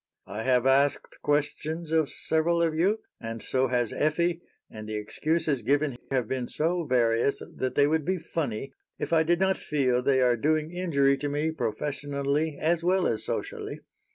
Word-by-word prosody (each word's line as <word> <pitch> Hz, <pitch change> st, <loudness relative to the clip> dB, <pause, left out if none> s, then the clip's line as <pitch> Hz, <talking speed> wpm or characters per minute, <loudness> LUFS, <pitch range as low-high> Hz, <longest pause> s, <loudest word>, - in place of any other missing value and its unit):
"I 105 Hz, +3 st, -5 dB
have 125 Hz, 0 st, +2 dB
asked 135 Hz, +2 st, +2 dB
questions 150 Hz, +2 st, -1 dB
of 160 Hz, -3 st, +2 dB
several 170 Hz, +2 st, +1 dB
of 165 Hz, -1 st, +1 dB
you, 195 Hz, +7 st, +1 dB, 0.2 s
and 115 Hz, 0 st, -5 dB
so 130 Hz, +3 st, 0 dB
has 120 Hz, -2 st, 0 dB
Effie, 170 Hz, +3 st, +1 dB, 0.3 s
and 110 Hz, 0 st, -9 dB
the 110 Hz, -, -3 dB
excuses 150 Hz, +6 st, -1 dB
given 140 Hz, +3 st, +1 dB
have 130 Hz, -4 st, 0 dB
been 130 Hz, -1 st, -2 dB
so 170 Hz, +2 st, 0 dB
various 120 Hz, 0 st, +2 dB, 0.2 s
that 130 Hz, 0 st, -2 dB
they 145 Hz, -, +5 dB
would 155 Hz, +1 st, +1 dB
be 185 Hz, +5 st, 0 dB
funny 140 Hz, -7 st, -4 dB, 0.2 s
if -, -, -3 dB
I 160 Hz, -, +5 dB
did 170 Hz, +2 st, +2 dB
not 190 Hz, 0 st, +2 dB
feel 130 Hz, -5 st, +1 dB
they 130 Hz, +1 st, +2 dB
are 125 Hz, -1 st, +4 dB
doing 155 Hz, +5 st, 0 dB
injury 140 Hz, -7 st, +2 dB
to 145 Hz, +1 st, -2 dB
me 150 Hz, +3 st, 0 dB
professionally, 145 Hz, +3 st, -2 dB
as 165 Hz, +1 st, +1 dB
well 185 Hz, +1 st, +2 dB
as 110 Hz, -, 0 dB
socially. -, -, -4 dB
145 Hz, 175 wpm, -27 LUFS, 130-160 Hz, 0.3 s, they